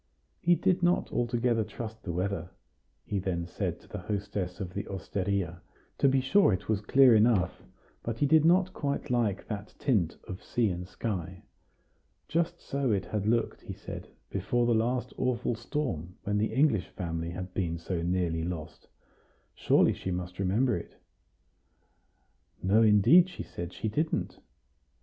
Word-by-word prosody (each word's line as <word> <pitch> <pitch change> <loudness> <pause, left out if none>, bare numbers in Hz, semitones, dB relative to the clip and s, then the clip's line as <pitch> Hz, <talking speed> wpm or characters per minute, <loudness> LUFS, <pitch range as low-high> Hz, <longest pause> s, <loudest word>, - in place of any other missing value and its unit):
He 175 +1 +4
did 185 0 +1
not 175 +1 +2
altogether 120 -1 +1
trust 110 +1 -7
the 90 - -4
weather, 90 0 -2 0.6
he 100 - -1
then 90 -3 -2
said 90 - -3
to - - -19
the - - -6
hostess 100 -1 -3
of 90 -3 -5
the 100 - -4
osteria; 95 -2 -2 0.4
to 140 - +5
be 135 0 +3
sure, 165 - +4
it 95 +1 -2
was 105 -2 +1
clear 130 +3 +6
enough, 105 -5 +3 0.4
but 115 -1 -4
he 145 - +2
did 155 +1 +5
not 185 +3 +4
quite 140 -5 -2
like 115 -6 +1
that 105 -1 -6
tint 100 - +1
of 95 - -6
sea 115 -5 +1
and 90 0 -5
sky. 95 -4 -4 0.8
Just 170 +1 0
so 140 -3 -1
it 100 -2 0
had 105 -1 -2
looked, 115 0 +1
he - - -7
said, - - -8 0.2
before 120 +5 0
the 120 - +3
last 120 +3 0
awful 125 -2 0
storm, 110 - -4
when 105 0 0
the 110 - 0
English 135 - +2
family 85 -2 -4
had 90 +1 -6
been 85 -3 -1
so 85 +1 -3
nearly 85 -2 0
lost; 85 -2 -6 0.7
surely - - +3
she - - -5
must 90 0 -4
remember 105 +6 +2
it? 85 - -8 1.7
No, 100 +4 +4
indeed, 115 - +6
she - - -7
said, 85 0 -6
she 110 - -4
didn't. 155 +9 -1
105 Hz, 160 wpm, -29 LUFS, 90-125 Hz, 1.7 s, clear